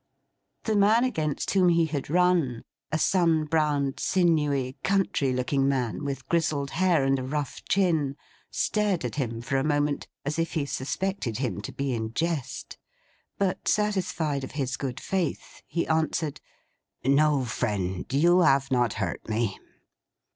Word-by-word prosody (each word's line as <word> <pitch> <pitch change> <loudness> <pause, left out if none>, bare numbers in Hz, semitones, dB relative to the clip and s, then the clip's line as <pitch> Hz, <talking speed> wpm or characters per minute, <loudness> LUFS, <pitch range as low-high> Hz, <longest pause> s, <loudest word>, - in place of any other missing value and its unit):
The 220 - 0
man 210 +4 +5
against 155 - -1
whom 185 -2 +4
he 170 -1 +4
had 145 -4 -4
run; 170 -8 +2 0.3
a 155 - +1
sun 165 -2 +2
browned, 150 -3 0
sinewy, 150 -8 +1
country 195 -8 +1
looking 135 +2 +1
man, 130 -2 -1
with 135 -2 -4
grizzled 155 -5 0
hair, 175 -4 +2
and 135 0 +2
a - - -4
rough 145 +1 -3
chin; 160 -8 +2 0.3
stared 205 - 0
at 125 - -4
him 115 -5 -2
for 135 +3 0
a 135 - +1
moment, 145 -1 0 0.2
as 150 +3 -2
if 165 - -1
he 150 -3 0
suspected 140 - -2
him 120 -7 -2
to 105 - -6
be 140 -1 -2
in 110 -1 -3
jest. 165 -5 -3 0.6
But, 195 -2 -1
satisfied 180 -9 0
of 130 - -7
his 135 -2 -2
good 130 -2 -4
faith, 185 -5 -3
he 170 - -1
answered: 160 -1 0 0.6
'No, 140 0 +3
friend. 100 -5 -2
You 170 +6 +4
have 140 -5 +3
not 120 -3 +2
hurt 95 +1 -4
me. 110 -2 -1
145 Hz, 150 wpm, -27 LUFS, 130-170 Hz, 0.6 s, man